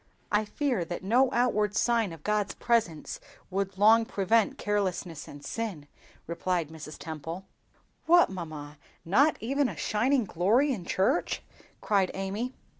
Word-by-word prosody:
"I 210 +1 +2
fear 250 - -1
that 175 +2 -5
no 245 +7 +4
outward 210 -4 +1
sign 230 -3 +2
of 165 -2 -11
God's 210 -1 0
presence 225 -10 0 0.3
would 195 0 -2
long 220 +3 +6
prevent 215 +1 +1
carelessness 185 -6 -2
and 145 0 -11
sin," 195 -7 -4 0.4
replied 170 -1 -1
Mrs. 155 -1 -9
Temple. 165 +4 -6 0.6
"What, 345 - +6
mamma, 155 -5 -7 0.3
not 270 - +4
even 270 +4 +1
a - - -8
shining 245 +3 +1
glory 215 - +2
in 185 -8 -6
church!" 190 +3 0 0.4
cried 195 -3 +2
Amy. 205 +7 -3
200 Hz, 135 wpm, -28 LUFS, 170-230 Hz, 0.6 s, long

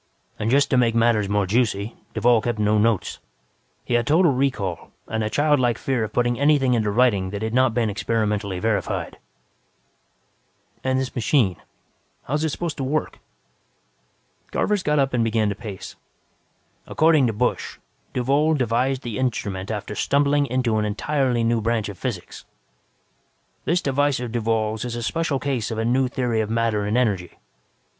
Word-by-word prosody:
"And, 110 - -1
just 140 +3 +3
to 130 - +4
make 115 -2 +2
matters 115 -3 +2
more 105 -1 +1
juicy, 110 0 0 0.2
Duvall 120 -2 +4
kept 120 0 -2
no 105 0 +2
notes. 110 -2 0 0.7
He - - -2
had 120 -1 +2
total 165 +2 +4
recall 125 - -2 0.2
and 110 0 -2
a 105 - -1
childlike 145 -4 +2
fear 130 -4 -1
of 110 - -4
putting 120 +1 0
anything 140 -3 +3
into 110 -3 +1
writing 100 -4 +2
that 100 +2 -5
had 110 0 -2
not 130 -2 +3
been 120 -2 +1
experimentally 105 -2 -1
verified." 105 +2 -2 1.6
"And 130 0 +1
this 130 -1 -3
machine, 115 - +1 0.7
how 135 - -5
is 150 +1 0
it 160 - +1
supposed 165 +1 -4
to 135 - -3
work?" 150 +4 -2 1.3
Garvers 210 -2 0
got 150 -3 +1
up 135 -2 +1
and 120 -2 +2
began 110 -2 +1
to 100 - -3
pace. 105 -3 -8 0.9
"According 155 -4 +3
to 115 - -1
Busch, 125 +4 -1 0.3
Duvall 140 +5 +2
devised 130 +1 0
the 115 -2 -4
instrument 100 -6 -2
after 105 -1 -4
stumbling 140 +4 +2
into 125 -3 0
an 105 - +1
entirely 125 +3 0
new 115 0 +1
branch 115 -1 0
of 100 - -8
physics. 110 -9 -5 1.2
"This 175 +2 +1
device 145 0 +1
of 125 -2 -5
Duvall's 110 -2 -1
is 120 -1 -4
a 120 - -4
special 160 +1 -1
case 130 -5 -2
of 110 - -4
a 110 - -1
new 130 +2 +2
theory 120 -3 -1
of 110 - -3
matter 115 -2 0
and 105 +3 0
energy. 100 -8 -1
120 Hz, 165 wpm, -23 LUFS, 110-135 Hz, 1.6 s, to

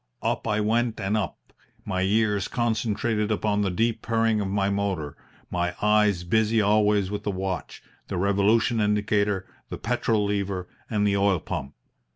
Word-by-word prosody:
Up - - -1
I 105 -1 +1
went 115 +2 0
and 100 +1 -1
up, 105 -5 -4 0.3
my 95 -2 -1
ears 105 0 +1
concentrated 110 -2 0
upon 105 -1 +1
the 100 - +1
deep 110 +5 0
purring 115 -1 +1
of 100 - -2
my 100 0 0
motor, 100 -7 -2 0.4
my 90 0 -1
eyes 105 -3 +3
busy 110 +4 +2
always 105 -1 +3
with 105 0 -3
the 105 - -3
watch, 95 -2 -4 0.2
the - - -3
revolution 105 +4 +2
indicator, 105 -2 +1 0.2
the - - -5
petrol 115 -2 0
lever, 100 -3 -2 0.2
and 105 -2 +1
the 100 -1 +2
oil 100 -1 +3
pump. 70 -2 -5
105 Hz, 160 wpm, -25 LUFS, 100-110 Hz, 0.4 s, eyes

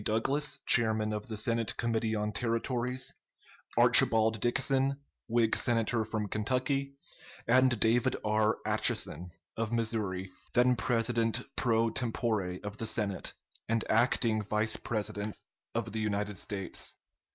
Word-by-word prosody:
Douglas, 135 +7 0
chairman 110 -2 +3
of 105 +2 -5
the 110 -2 -5
Senate 115 +1 -1
Committee 115 -1 0
on 105 0 -1
Territories; 125 +3 -1 0.6
Archibald 110 -1 +5
Dixon, 135 +2 +1 0.3
Whig 115 -1 +2
Senator 115 -1 +1
from 110 -1 -3
Kentucky; 130 +6 -1 0.5
and 125 -1 +4
David 115 +3 +3
R. 110 +1 +2
Atchison, 90 +1 0 0.3
of 115 -1 -2
Missouri, 105 -5 -1 0.2
then 125 +1 +5
president 115 +3 +1
pro 115 -2 +2
tempore 110 -6 -1
of 105 0 -6
the 115 - -3
Senate, 105 -3 -2 0.4
and 115 0 +1
acting 115 -1 +2
Vice 105 +2 0
President 105 -1 -3 0.4
of - - -2
the 110 - -3
United 105 -2 -2
States. 95 -3 -4
115 Hz, 120 wpm, -31 LUFS, 105-120 Hz, 0.6 s, Archibald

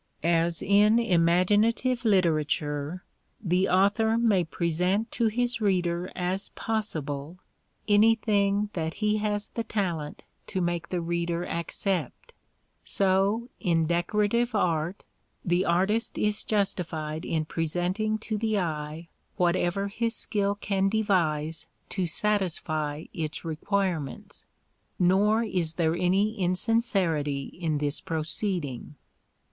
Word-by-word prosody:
As 170 0 +1
in 210 +3 +5
imaginative 210 +5 +2
literature 155 -4 +1 0.4
the 185 0 +1
author 205 +4 +3
may 215 -6 +3
present 180 +6 0
to 235 - +1
his 245 +2 0
reader 180 -3 0
as 185 +2 -2
possible 160 -8 -3 0.5
anything 205 -1 +3
that 160 -1 -3
he 210 0 +1
has 210 -1 -2
the 230 - -3
talent 170 -9 -3 0.2
to 190 - -2
make 175 -1 -1
the 180 -2 -1
reader 170 0 -1
accept, 195 - -3 0.5
so 200 +5 +1
in 165 -2 +2
decorative 210 +8 +1
art 170 -1 0 0.4
the 175 +2 +2
artist 195 +6 +1
is 210 0 0
justified 165 -7 -2
in 155 -1 -1
presenting 180 +7 -1
to 215 -1 -4
the 220 -1 0
eye 155 -2 -3 0.3
whatever 180 +2 +1
his 230 +3 -2
skill 200 -2 0
can 195 -1 0
devise 165 -7 0 0.2
to 185 -3 -1
satisfy 160 -6 -1
its 155 0 -4
requirements; 165 -2 -2 0.5
nor 200 +5 +3
is 175 -7 -1
there 165 -1 +1
any 195 +5 +1
insincerity 180 - +1 0.2
in 160 -3 0
this 145 0 -1
proceeding. 160 - -3
185 Hz, 110 wpm, -27 LUFS, 165-210 Hz, 0.5 s, in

